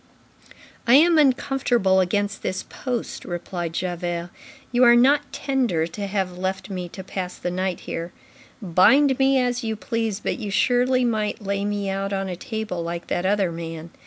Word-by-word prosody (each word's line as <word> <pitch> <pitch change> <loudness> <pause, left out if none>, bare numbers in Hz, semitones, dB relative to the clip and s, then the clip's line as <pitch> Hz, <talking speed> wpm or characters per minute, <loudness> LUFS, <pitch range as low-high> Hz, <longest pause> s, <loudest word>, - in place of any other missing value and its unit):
"I 240 - +7
am 325 +2 +6
uncomfortable 255 -8 +2
against 205 +2 0
this 190 - -3
post," 245 -3 -5
replied 175 -1 -4
Javert. 175 -1 -3 0.4
"You 250 +1 +3
are 240 -1 +8
not 280 +3 +4
tender 260 - 0
to 200 +5 -5
have 190 -2 -2
left 190 +2 -3
me 180 -2 -4
to 190 - -9
pass 185 -1 -5
the 180 - -3
night 185 0 -2
here. 170 +1 -5 0.5
Bind 260 - +4
me 270 0 +4
as 245 0 0
you 220 -1 -2
please, 225 -1 -2
but - - -3
you 210 -3 -4
surely 250 +4 +2
might 215 -3 -1
lay 200 0 -1
me 205 -1 -2
out 195 +1 -2
on 195 0 -1
a 180 - -3
table 220 -3 -4
like 170 +1 -4
that 175 +1 0
other 195 -3 +1
man." 165 0 -7
200 Hz, 170 wpm, -23 LUFS, 180-245 Hz, 0.5 s, are